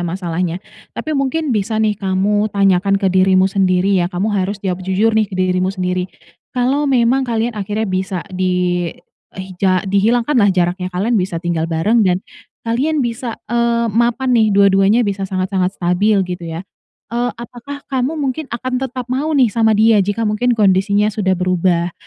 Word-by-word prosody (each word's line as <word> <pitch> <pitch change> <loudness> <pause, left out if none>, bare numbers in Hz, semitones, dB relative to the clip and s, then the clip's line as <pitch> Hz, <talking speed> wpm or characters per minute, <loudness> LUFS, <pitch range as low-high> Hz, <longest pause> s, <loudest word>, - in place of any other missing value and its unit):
masalahnya. 175 0 -3 0.4
Tapi 310 -1 -3
mungkin 275 0 -1
bisa 215 +2 -1
nih, 215 -1 +1
kamu 205 +2 0
tanyakan 195 0 +2
ke 195 - -1
dirimu 185 0 +3
sendiri 190 0 +1
ya. 175 - -2
Kamu 200 +4 -1
harus 195 +1 -1
jawab 185 -2 -3
jujur 200 +4 +1
nih, 215 -2 +1
ke - - -6
dirimu 185 0 +1
sendiri. 180 -1 -3 0.4
Kalau 270 +4 0
memang 250 +1 +3
kalian 235 -2 -1
akhirnya 210 +2 -3
bisa 185 -1 -3
di 180 -1 0 0.5
hija 185 0 -1
dihilangkanlah 225 +3 +2
jaraknya, 180 0 0
kalian 200 +7 -1
bisa 185 -4 0
tinggal 165 -1 -2
bareng 210 +8 +2
dan 180 -2 +2 0.5
kalian 285 +7 0
bisa, 230 0 -4
eee, 235 0 +1
mapan 240 +3 +1
nih, 220 -2 +4
dua-duanya 200 +3 +4
bisa 195 -1 -2
sangat-sangat 185 0 -1
stabil 185 +4 +1
gitu 180 -1 -6
ya? 165 +4 -6 0.5
Eee, 240 +1 0
apakah 245 +4 -9
kamu 265 +4 -2
mungkin 275 +1 -3
akan 255 +2 -3
tetap 255 -1 -4
mau 270 +5 -2
nih 245 -6 +3
sama 225 -1 +2
dia, 220 -1 +4
jika 210 +3 -1
mungkin 225 +4 0
kondisinya 200 +1 +2
sudah 190 -3 0
berubah? 180 -1 0
200 Hz, 160 wpm, -17 LUFS, 185-235 Hz, 0.5 s, nih